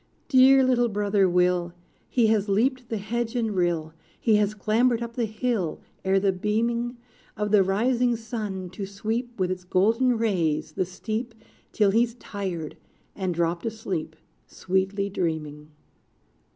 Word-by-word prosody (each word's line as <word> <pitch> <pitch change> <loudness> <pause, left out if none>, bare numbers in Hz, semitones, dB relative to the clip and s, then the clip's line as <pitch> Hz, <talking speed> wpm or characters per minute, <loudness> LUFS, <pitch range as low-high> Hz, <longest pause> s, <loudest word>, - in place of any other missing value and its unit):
Dear 265 -1 +7
little 245 -2 +3
brother 200 -2 +2
Will! 180 -1 +2 0.4
He 240 -3 +3
has 215 -2 +2
leaped 245 +5 +1
the 225 - -2
hedge 230 +3 -3
and 225 -4 -1
rill, 170 -3 0 0.3
He 220 -2 +3
has 210 0 +1
clambered 230 +3 +2
up 235 0 -6
the 235 -1 0
hill, 215 -6 -2 0.2
Ere 190 0 +3
the 195 0 +2
beaming 235 +5 -1 0.4
Of 210 -1 -1
the 210 -2 +6
rising 240 +6 +2
sun, 210 -5 -5
to 195 +1 -5
sweep 225 +4 -4
With 185 -1 +1
its 180 0 -4
golden 225 +7 +2
rays 175 -10 0
the 180 - -1
steep, 220 +6 -5 0.4
Till 205 -3 +3
he's 230 +2 +2
tired, 190 -9 -5 0.4
and 190 -2 -2
dropped 170 0 0
asleep, 190 -8 -4 0.3
Sweetly 190 +2 -1
dreaming. 155 -6 -3
210 Hz, 145 wpm, -25 LUFS, 185-235 Hz, 0.4 s, Dear